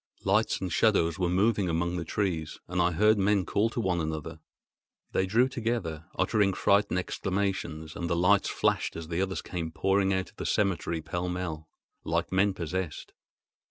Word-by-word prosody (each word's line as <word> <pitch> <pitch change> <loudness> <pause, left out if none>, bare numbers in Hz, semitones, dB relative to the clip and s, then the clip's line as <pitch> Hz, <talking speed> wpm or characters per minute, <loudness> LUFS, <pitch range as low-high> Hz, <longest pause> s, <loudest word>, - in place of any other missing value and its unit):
Lights - - +2
and 90 -3 -3
shadows 90 -6 +2
were 90 -2 +1
moving 100 +1 +2
among 85 +2 0
the 85 - -2
trees, 85 -3 -2
and 90 0 0
I 85 - +4
heard 105 +5 +3
men 100 -1 +2
call 105 +7 +1
to 115 - -4
one 90 -6 0
another. 80 +1 -4 0.7
They 95 - +1
drew 115 +6 +4
together, 110 -11 -3
uttering 105 -4 +2
frightened 100 0 +2
exclamations; 90 -4 -2
and 85 - -3
the 85 - +1
lights 90 +4 +3
flashed - - 0
as 80 -1 -7
the 85 +2 -1
others 95 0 -2
came 85 -3 -4
pouring 95 +3 +1
out 95 -1 -1
of - - -36
the - - -5
cemetery 85 -5 0
pell 90 +3 -3
mell, 85 -4 -4 0.3
like 85 +1 -1
men 95 +1 +2
possessed. 90 -1 -4
90 Hz, 175 wpm, -28 LUFS, 85-100 Hz, 0.7 s, I